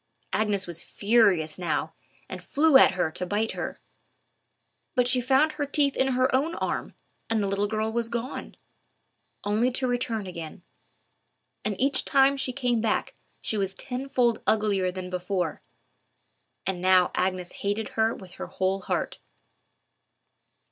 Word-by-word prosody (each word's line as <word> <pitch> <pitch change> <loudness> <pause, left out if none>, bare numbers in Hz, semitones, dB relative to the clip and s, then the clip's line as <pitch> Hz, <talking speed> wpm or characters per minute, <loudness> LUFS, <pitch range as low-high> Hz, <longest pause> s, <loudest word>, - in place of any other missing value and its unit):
Agnes 205 -3 +1
was 170 -1 -4
furious 200 -8 +2
now, 175 - -1 0.3
and - - -7
flew 305 0 +3
at 265 - +8
her 175 -4 0
to 180 - -4
bite 205 +4 0
her. - - -5 1.2
But 250 -1 +3
she 250 0 +2
found 270 +5 +3
her 290 -2 -3
teeth 285 -1 +2
in 265 0 +1
her 255 +1 +2
own 300 +6 +1
arm, - - -3 0.3
and 225 -2 +1
the - - 0
little 200 +1 0
girl 220 +1 -1
was 235 -1 -1
gone—only 235 -2 -5
to 260 - 0
return 240 -4 -1
again; 170 -2 -7 1.0
and 205 -3 -2
each 275 +2 +2
time 275 0 +4
she 265 -2 -1
came 245 -3 0
back 220 -1 0 0.3
she 220 - -1
was 195 -1 -1
tenfold 250 -2 0
uglier 205 -4 +2
than 180 0 -6
before. 180 0 -2 1.0
And 185 -2 -2
now 185 -1 +5
Agnes 185 -1 -1
hated 205 +2 -1
her 225 +1 +1
with 185 -2 -11
her - - -7
whole 190 +1 -1
heart. - - -2
220 Hz, 145 wpm, -26 LUFS, 190-255 Hz, 1.2 s, at